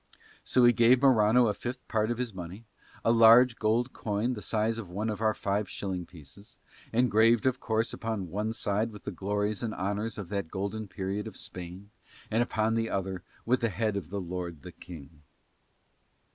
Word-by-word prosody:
So 125 -1 +3
he 120 - +7
gave 120 +3 +4
Morano 120 -2 +5
a 105 - +1
fifth 125 +4 -6
part 110 -1 0
of 120 - -1
his 125 -3 -3
money, 95 +5 -8 0.4
a 115 - +5
large 115 +1 +7
gold 115 +4 +1
coin 110 +4 -1
the 105 - -6
size 110 +4 0
of 100 -6 -7
one 105 +5 -2
of 105 - -6
our 110 -1 +2
five 100 0 -1
shilling 90 -3 -4
pieces, 90 - -14 0.3
engraved 115 -1 +4
of 130 -1 +1
course 110 0 0
upon 110 -7 -4
one 105 +3 -1
side 105 +1 -1
with 105 - -12
the - - -4
glories 105 +1 -2
and 115 -2 -3
honours 100 +3 -2
of 100 -4 -6
that 100 -5 -3
golden 100 +3 -4
period 100 +3 -4
of 110 - -9
Spain, 90 +3 -8 0.4
and 115 +2 +2
upon 110 -2 0
the 115 0 0
other 95 -1 -3 0.2
with 125 +2 +2
the 115 - 0
head 105 +2 -1
of 90 -6 -4
the 100 +2 -3
lord 90 -4 -5
the - - -8
King. 75 -3 -12
105 Hz, 190 wpm, -29 LUFS, 95-115 Hz, 0.4 s, he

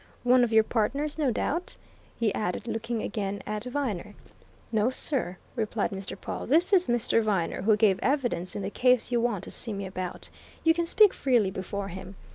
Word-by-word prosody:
"One 250 0 +5
of 235 - 0
your 220 0 +6
partners, 280 +8 -1
no 290 -4 +2
doubt!" 330 +9 -2 0.4
he 225 -4 +1
added, 210 +2 -3
looking 230 0 -3
again 200 -1 -3
at 210 +2 -4
Viner. 240 -7 -3 0.6
"No 220 +1 +2
sir," 255 - -1 0.2
replied 220 -2 -1
Mr. 195 0 -6
Pawle. - - -5
"This 335 - +3
is 365 -2 +5
Mr. 240 -1 +2
Viner, 195 -7 0
who 210 +2 +3
gave 205 -3 +3
evidence 245 - 0
in 200 - -3
the 195 - -3
case 250 0 +2
you 240 -1 +2
want 230 -6 -1
to - - -7
see 225 - -3
me 200 0 -4
about. 185 -1 -6 0.3
You 325 - +5
can 340 0 -1
speak 420 +3 +6
freely 240 -8 +2
before 195 +1 -4
him. 190 +2 -8
225 Hz, 190 wpm, -27 LUFS, 200-255 Hz, 0.6 s, your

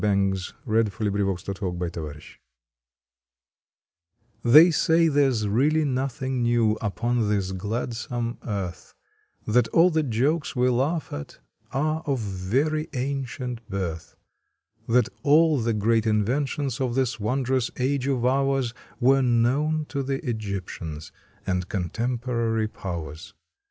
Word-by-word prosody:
June 100 -2 +2 0.3
Twenty 110 -2 +2
fifth 95 - -15
THE 100 -2 -1
OLD 90 -3 -2
AND 90 -1 -3
THE 85 - -4
NEW 75 - -5
r 75 +1 -10 2.3
PHEY 160 +6 +9
say 165 +1 +3
there 145 -3 +3
s 115 -4 -1
really 145 +9 +2
nothing 130 -1 -2
new 120 -2 +3
upon 115 +1 0
this 100 -2 0
gladsome 115 +4 -3
earth; 100 -5 -5 0.5
That 115 +1 +3
all 170 +7 +4
the 160 -1 +2
jokes 140 +5 0
we 125 0 +3
laugh 140 +7 0
at 70 0 -7 0.3
are 155 +3 0
of 140 -2 +1
very 115 - -1
ancient 125 -2 -3
birth; 90 -5 -4 0.7
That 125 +2 +3
all 155 0 +4
the 115 0 0
great 110 +2 +2
inventions 135 +5 0
of 125 -2 -1
this 130 -3 0
won 125 +6 -1
drous 130 -1 +1
age 135 +1 0
of 130 -3 0
ours 135 -2 +1 0.3
Were 135 +2 +4
known 135 +6 +2
to 140 - -2
the 135 0 -3
Egyptians 95 -8 -5 0.3
and 90 -1 -1
con 90 -4 -2
temporary 115 -2 -1
powers. 85 -5 -7
120 Hz, 135 wpm, -25 LUFS, 105-135 Hz, 2.3 s, PHEY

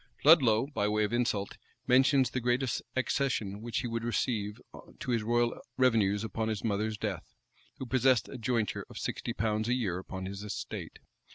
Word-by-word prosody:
Ludlow, 130 -7 +6
by 135 -8 -1
way 105 0 +1
of 105 - -1
insult, 115 -5 0 0.3
mentions 130 0 +4
the 130 - -1
great 125 +2 +1 0.3
accession 125 -6 -1
which 115 0 -2
he 125 - -3
would 115 0 -3
receive 110 -2 -1 0.4
to 125 - -3
his 115 -2 +2
royal 120 +2 +1 0.2
revenues 110 -6 +3
upon 110 +1 -2
his 110 -2 -2
mother's 110 0 -1
death, - - -5 0.4
who 130 - -5
possessed 130 -1 +3
a 130 - -8
jointure 115 -2 -1
of - - -10
sixty - - -3
pounds 110 -1 -1
a 125 - +3
year 95 -8 -1
upon 95 0 -6
his 100 +1 -6
estate. 105 -1 -6
115 Hz, 175 wpm, -30 LUFS, 105-125 Hz, 0.4 s, Ludlow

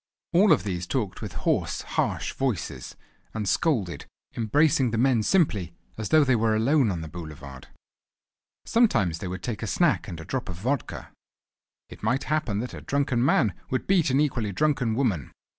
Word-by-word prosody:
All 190 +4 +5
of 90 - +4
these 90 -3 -3
talked 110 -6 -2
with - - -6
hoarse, - - 0
harsh - - -1
voices; 90 - -3 0.4
and 105 -2 -2
scolded, 100 - 0 0.3
embracing 130 +3 +2
the 115 - -2
men 125 0 +3
as 105 - -1
simply 105 - +1 0.2
as 110 -2 -4
though 155 -1 +6
they 130 -3 +3
were 110 -1 +2
alone 130 +3 +3
on 90 -4 -3
the 80 - -6
boulevard. 75 -5 -9 1.0
Sometimes 110 - +2
they 95 - -5
would 90 +2 -6
take 115 -4 -4
a 110 - -3
snack 170 - +1
and 85 -5 -7
a 80 - -8
drop 130 +4 -3
of 90 - -5
vodka. 125 +10 -3 0.8
It - - -13
might 125 +6 0
happen 150 -9 -1
that 125 - -6
a - - -8
drunken 135 -4 0
man 115 -6 +3 0.2
would 130 -2 -1
beat 185 -6 +3
an 135 +2 +2
equally 130 -8 0
drunken 125 -2 +1
woman. 105 - -1
115 Hz, 180 wpm, -26 LUFS, 95-140 Hz, 1.0 s, though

